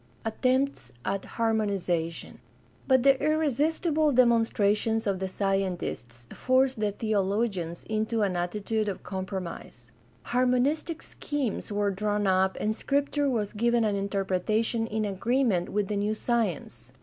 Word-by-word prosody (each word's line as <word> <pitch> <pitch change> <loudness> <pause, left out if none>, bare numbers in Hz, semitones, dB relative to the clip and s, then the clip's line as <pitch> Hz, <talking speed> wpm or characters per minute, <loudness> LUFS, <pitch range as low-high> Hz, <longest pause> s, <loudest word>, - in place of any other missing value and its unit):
Attempts 255 - 0
at 195 0 -1
harmonization. 200 -7 -1 0.2
— - - -31
But 260 -2 +4
the 275 0 +4
irresistible 310 +1 +2
demon 240 -3 +5
strations 220 +1 +1
of 195 -2 0
the 190 - -2
scientists 185 - -2
forced 255 -1 +2
the 210 -1 +1
theologians 200 -4 -1
into 220 0 0
an 195 -2 +1
atti 180 +4 -3
tude 220 -1 0
of 195 - -4
compromise. 185 - -6 0.3
Harmonistic 255 - +1
schemes 275 -8 -3
were 205 0 +1
drawn 205 +1 -1
up 190 0 +2
and 215 +1 0
Scripture 285 +2 0
was 215 -5 -1
given 235 +2 +2
an 210 -2 +1
interpretation 200 +3 0
in 220 -1 -1
agreement 205 -1 +1
with 205 -1 -1
the 205 - -2
new 210 +2 0
science. 175 - -2
215 Hz, 135 wpm, -27 LUFS, 195-245 Hz, 0.3 s, demon